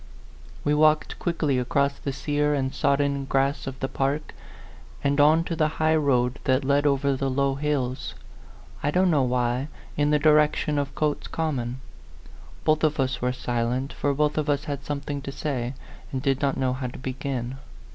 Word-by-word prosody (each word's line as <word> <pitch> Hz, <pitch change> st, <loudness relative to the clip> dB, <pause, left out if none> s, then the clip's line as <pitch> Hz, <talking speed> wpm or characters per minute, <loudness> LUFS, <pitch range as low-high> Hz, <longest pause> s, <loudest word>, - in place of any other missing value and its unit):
We 145 Hz, -, +2 dB
walked 155 Hz, +1 st, +3 dB
quickly 155 Hz, -6 st, 0 dB
across 140 Hz, +3 st, +1 dB
the 140 Hz, -, -3 dB
sear 145 Hz, +2 st, 0 dB
and 135 Hz, -1 st, -1 dB
sodden 140 Hz, 0 st, +1 dB
grass 135 Hz, +1 st, 0 dB
of 135 Hz, 0 st, -6 dB
the 135 Hz, -, -1 dB
park, 140 Hz, +3 st, -2 dB, 0.7 s
and 140 Hz, +1 st, +3 dB
on 155 Hz, +3 st, +5 dB
to 170 Hz, -, -3 dB
the 155 Hz, -1 st, +2 dB
high 160 Hz, 0 st, +3 dB
road 130 Hz, -4 st, +2 dB
that 130 Hz, 0 st, +2 dB
led 145 Hz, +1 st, +3 dB
over 140 Hz, 0 st, +2 dB
the 135 Hz, +1 st, -1 dB
low 135 Hz, +1 st, +1 dB
hills, 135 Hz, -, -2 dB, 0.7 s
I -, -, +1 dB
don't 180 Hz, +3 st, +3 dB
know 150 Hz, -3 st, +3 dB
why, 125 Hz, +1 st, 0 dB, 0.3 s
in 145 Hz, 0 st, +2 dB
the 150 Hz, -, +4 dB
direction 150 Hz, 0 st, +3 dB
of 140 Hz, -1 st, -3 dB
Cotes 150 Hz, -1 st, -1 dB
Com 160 Hz, -3 st, -1 dB
mon. 120 Hz, +2 st, -4 dB, 0.8 s
Both 155 Hz, 0 st, +3 dB
of 155 Hz, -1 st, +2 dB
us 135 Hz, 0 st, 0 dB
were 125 Hz, 0 st, +1 dB
silent, 125 Hz, +1 st, -2 dB
for 145 Hz, -, 0 dB
both 150 Hz, +1 st, +1 dB
of 150 Hz, 0 st, -2 dB
us 145 Hz, 0 st, +1 dB
had 140 Hz, -1 st, -4 dB
something 145 Hz, 0 st, -4 dB
to 140 Hz, -, -6 dB
say, 135 Hz, -3 st, -3 dB, 0.4 s
and 130 Hz, -, -2 dB
did 135 Hz, 0 st, 0 dB
not 140 Hz, -1 st, +1 dB
know 130 Hz, -1 st, +1 dB
how 130 Hz, 0 st, -3 dB
to 120 Hz, -, -8 dB
begin. 130 Hz, -1 st, -4 dB
140 Hz, 185 wpm, -25 LUFS, 130-150 Hz, 0.8 s, on